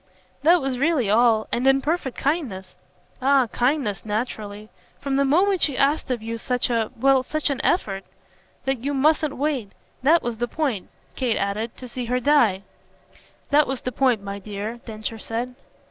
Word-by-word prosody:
"That 335 +3 +5
was 265 -2 -2
really 280 -8 +2
all 225 -1 +4
and 245 +3 +1
in 270 0 +5
perfect 290 -2 -2
kindness." 260 - -2 0.5
"Ah 270 0 +4
kindness 245 -5 0
naturally: 215 -1 -4 0.3
from 275 -1 -2
the 280 - +3
moment 365 +7 +3
she 285 -4 +2
asked 285 +1 +2
of 240 -4 -2
you 230 +1 -4
such 250 +1 0
a 225 -2 +1
well, 270 +1 +4
such 305 +3 -1
an 275 - -2
effort. 195 - 0 0.6
That 270 -3 -1
you 285 +1 -1
mustn't 300 +1 +2
wait 270 -7 -2 0.3
that 320 +6 +4
was 235 -2 -3
the 240 - 0
point," 260 -8 -2 0.3
Kate 245 -4 0
added 210 +4 -2
"to 255 - -8
see 245 0 -5
her 250 +2 0
die." 235 -8 +3 0.9
"That 295 +1 +5
was 265 -1 -3
the 255 - -3
point, 245 -4 +2
my 200 0 -5
dear," 210 +3 -5
Densher 220 0 -5
said. 235 +4 -4
250 Hz, 175 wpm, -23 LUFS, 220-280 Hz, 0.9 s, That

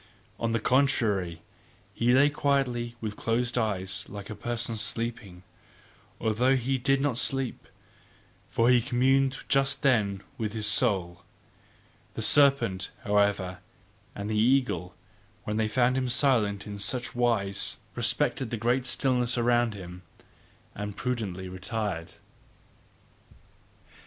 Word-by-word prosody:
On 115 -1 -1
the 115 - +1
contrary, 105 -10 +1 0.5
he 115 +4 +2
lay 145 +2 +5
quietly 130 -5 0
with 105 -2 -4
closed 120 +3 -1
eyes 100 -5 -2
like 100 +1 -8
a - - -5
person 120 +1 -3
sleeping, 115 -4 -4 0.8
although 120 +5 +2
he 130 +1 -1
did 135 +2 +2
not 135 -4 0
sleep; 135 -2 -2 0.8
for 115 +2 +3
he 125 -1 +5
communed 135 +3 +2
just 135 +1 +1
then 105 -8 +2 0.2
with 110 -2 -2
his 110 -2 -2
soul. 100 -6 +1 0.9
The - - -3
serpent, 135 -10 +4
however, 100 -3 +1 0.6
and 100 0 -5
the 110 - -2
eagle, 125 -7 +1 0.5
when 105 0 -3
they 110 -1 +1
found 125 +3 +2
him 130 -1 0
silent 115 -6 +2
in 100 -1 -7
such 125 +6 -2
wise, 115 -5 0 0.2
respected 130 -4 0
the 115 - -3
great 120 +3 0
stillness 125 -2 +1
around 120 -2 +2
him, 90 -2 -9 0.7
and 105 -1 -6
prudently 105 -7 -3
retired. 95 -2 -4
115 Hz, 120 wpm, -28 LUFS, 100-125 Hz, 0.9 s, lay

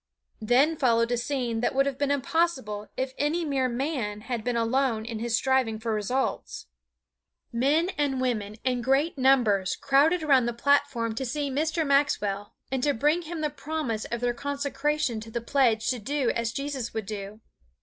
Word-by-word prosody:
Then 265 +8 +3
followed 230 -3 +2
a - - +3
scene 245 -2 -2
that 245 - 0
would 275 +1 +4
have 275 -1 -3
been 285 -1 +1
impossible 270 -7 0
if 260 0 -2
any 320 +4 0
mere 270 -3 0
man 240 -5 -2
had 235 -1 -4
been 245 0 -1
alone 230 -1 +1
in 230 -2 -5
his 230 0 0
striving 260 -4 +1
for 225 0 -2
results. 230 +6 -2 0.9
Men 290 +9 +2
and 275 -3 +1
women 215 -5 -1
in 250 -2 0
great 270 +6 +1
numbers 240 -8 +3
crowded 295 +5 +3
around 265 -5 +4
the 240 - -1
platform 240 -3 +1
to 235 - -3
see 280 +2 -2
Mr. 315 +3 0
Maxwell 210 -8 +1 0.2
and 265 -1 -1
to 285 +1 +1
bring 300 +8 +2
him 330 -1 -6
the 300 -1 -1
promise 275 -9 -3
of 235 0 -4
their 245 0 +1
consecration 285 -1 -1
to 220 +1 -9
the 235 - -3
pledge 235 -2 +2
to 250 - -3
do 270 +3 0
as 235 0 -2
Jesus 275 -4 -4
would 220 -2 -2
do. 205 0 -6
260 Hz, 180 wpm, -27 LUFS, 230-285 Hz, 0.9 s, would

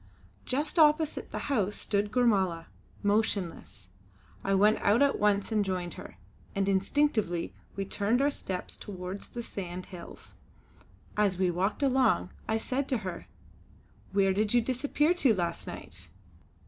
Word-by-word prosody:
Just 295 +6 -1
opposite 305 0 +3
the - - -5
house 210 -8 0
stood 205 0 -1
Gormala, 190 -9 +2 0.4
motionless. 195 - -1 0.5
I 195 0 +2
went 210 +3 +4
out 215 +7 +4
at 280 - +2
once 205 0 +2
and 215 -2 +2
joined 180 -3 -3
her, - - -10 0.4
and 195 0 +1
instinctively 195 -3 +1 0.2
we 195 0 -2
turned 205 +5 +1
our 285 +1 +3
steps 185 -9 -3
toward 185 0 -6
the 240 - -7
sand 180 -4 -6
hills. 175 - -10 0.8
As 205 -3 +2
we 185 -1 +2
walked 195 +9 -1
along 255 -8 +3 0.2
I 220 - +1
said 260 +4 -2
to 255 - +2
her: 180 -2 -5 0.8
"Where 195 -1 +3
did 210 +3 +1
you 240 - +6
disappear 285 +6 +1
to 270 -11 +3
last 170 -2 -2
night?" - - -8
205 Hz, 145 wpm, -29 LUFS, 190-250 Hz, 0.8 s, you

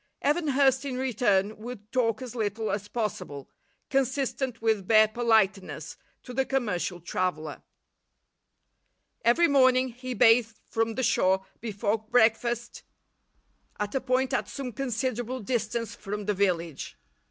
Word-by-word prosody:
Evan 305 +3 +1
Hurst, 270 -1 +3
in 265 -3 -4
return, 215 -5 +1
would 215 -1 -9
talk 230 -2 +1
as 250 - -7
little 220 -1 -2
as 205 0 -3
possible, 205 - -4 0.4
consistent 265 -2 0
with 220 -4 0
bare 215 -1 +6
politeness, 215 -4 +1 0.3
to 250 - -9
the 265 +2 +2
commercial 210 -10 -1
traveller. 160 -3 -3 1.6
Every 290 +9 +4
morning 260 -3 +4
he 250 +1 -6
bathed 225 -1 +4
from 225 0 -1
the 260 - -1
shore 190 -3 +2
before 215 -1 -1
breakfast 235 +1 +1 1.0
at 210 0 -2
a 270 - 0
point 260 +1 0
at - - -1
some 270 -3 -5
considerable 250 0 -2
distance 230 -1 -2
from 205 +1 -6
the 210 - +1
village. 170 - -1
230 Hz, 130 wpm, -27 LUFS, 205-255 Hz, 1.6 s, bare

